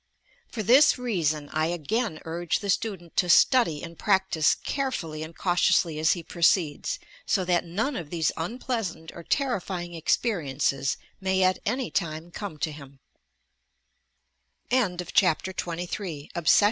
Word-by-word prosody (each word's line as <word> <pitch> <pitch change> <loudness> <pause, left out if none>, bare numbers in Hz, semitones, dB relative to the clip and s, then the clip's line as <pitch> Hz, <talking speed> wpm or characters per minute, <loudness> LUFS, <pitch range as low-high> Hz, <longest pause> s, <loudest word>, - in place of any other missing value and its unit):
For 220 - -3
this 270 +8 +6
reason 165 -12 -1
I 155 +1 +1
again 175 - -2
urge 170 +1 -1
the 200 -1 -1
student 185 -5 -3
to 180 - +2
study 225 - +4
and 170 -1 -9
practice 190 -6 +3
carefully 170 - -3
and 160 +1 -8
cautiously 175 -3 +2
as 160 +1 +4
he 175 - -6
proceeds, 170 - +1 0.3
so 190 -3 +1
that 175 -1 +1
none 220 - -2
of 165 -4 -5
these 165 -2 0
unj 220 +10 -4
pleasant 200 -10 -3
or 170 - -9
terrifying 185 - -2
experiences 145 - 0 0.2
may 190 0 +1
at 185 0 +3
any 250 +3 -1
time 165 -2 -3
come 195 -4 -6
to 155 +1 -2
hiuL 140 -2 -12 2.2
CHAPTER 185 0 +2
XXIV 175 0 -4
^^^^ - - -14
PRAYER. 160 -8 -5
175 Hz, 140 wpm, -26 LUFS, 160-205 Hz, 2.2 s, this